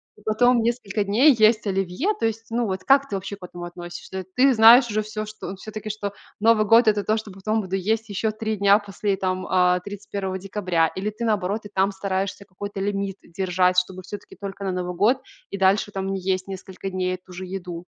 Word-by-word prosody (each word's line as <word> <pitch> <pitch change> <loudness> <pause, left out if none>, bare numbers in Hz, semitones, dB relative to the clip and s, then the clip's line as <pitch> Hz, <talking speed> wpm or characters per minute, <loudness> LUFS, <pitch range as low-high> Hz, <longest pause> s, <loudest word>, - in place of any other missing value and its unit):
и - - -20
потом 235 +3 +3
несколько 225 -3 -1
дней 235 +9 +5
есть 215 0 +4
оливье. 195 - 0
То 225 - +2
есть, 225 0 -4
ну, 235 0 0
вот, 190 -1 -3
как 275 0 +4
ты - - -2
вообще 195 +1 -5
к 195 - -18
этому 175 -1 -8
относишься? 175 +2 -7
Ты 265 +2 +5
знаешь 235 +2 +8
уже 215 0 0
всё, 215 0 -5
что, 210 -3 -7
всё-таки, 215 +2 -7
что 205 -1 -4 0.3
Новый 220 0 +4
год 230 +3 +6
это 210 -1 +3
то, 215 +2 +1
что 215 -2 -6
потом 215 +4 -1
буду 190 -1 -3
есть 220 +4 -1
еще 205 +2 -1
3 220 0 -3
дня 200 0 +5
после, 200 -1 -2
там, 185 -1 -2
э, 180 -1 +3
31 200 -1 -5
декабря, 185 -4 0
или 195 +3 -2
ты 215 +3 -5
наоборот 210 -1 -1
и - - -8
там 195 +1 +2
стараешься 195 0 -3
какой-то 200 +1 -7
лимит 195 -1 -2
держать, 180 0 0
чтобы 185 0 -6
всё-таки 205 +2 -9
только 200 0 -6
на 190 - -1
Новый 180 -1 -3
год 220 +8 +3 0.3
и 200 - -5
дальше 195 +2 +2
там 195 0 -3
не 195 - -2
есть 185 0 -1
несколько 190 0 -7
дней 185 0 -1
эту 185 0 -15
же 185 +1 -6
еду? 180 -2 -6
200 Hz, 215 wpm, -23 LUFS, 185-215 Hz, 0.3 s, знаешь